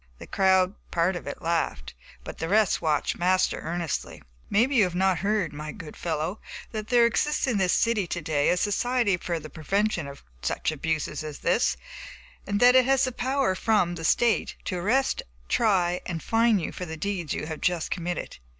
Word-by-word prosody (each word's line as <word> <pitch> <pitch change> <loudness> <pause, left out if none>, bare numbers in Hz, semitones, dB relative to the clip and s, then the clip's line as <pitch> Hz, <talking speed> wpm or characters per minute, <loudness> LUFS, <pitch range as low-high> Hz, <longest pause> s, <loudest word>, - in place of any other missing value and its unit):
The - - -10
crowd 190 -1 +3 0.2
(part 175 +2 +1
of 175 - -7
it) 145 - -6
laughed, 165 - -1 0.3
but - - -9
the 160 - -3
rest 210 -1 +3
watched 155 -3 0
Master 185 +1 +2
earnestly. 170 -2 -4 0.3
"Maybe 250 +7 +2
you 215 - +6
have 180 -1 -4
not 190 -1 +2
heard, 200 -6 0
my 150 +1 -6
good 165 -8 -10
fellow, 165 +4 -3 0.3
that 215 -1 -5
there 240 0 +5
exists 295 +6 +1
in 240 -6 0
this 185 -2 +2
city 225 -5 +1
to 175 - -3
day 150 -3 +1
a 180 - +2
society 215 +1 +1
for 170 -1 -3
the 155 - -9
prevention 175 +3 -1
of 140 0 -11 0.2
such - - -1
abuses 155 0 -2
as 150 -2 -6
this; 60 +1 +2 0.7
and 205 0 0
that 245 +2 +7
it 255 -1 +6
has 270 0 +3
power 260 -4 +1
from 185 -3 +1
the 165 -2 -7
State 230 +6 +2
to 180 - -2
arrest, 250 +9 +1 0.3
try 180 -6 +2
and 170 -3 -4
fine 225 -1 +3
you 170 - -3
for 180 - -6
the 160 0 -6
deeds 180 -3 -3
you - - -4
have 155 -1 -6
just 175 -3 0
committed. 175 - -4
180 Hz, 190 wpm, -26 LUFS, 160-215 Hz, 0.7 s, that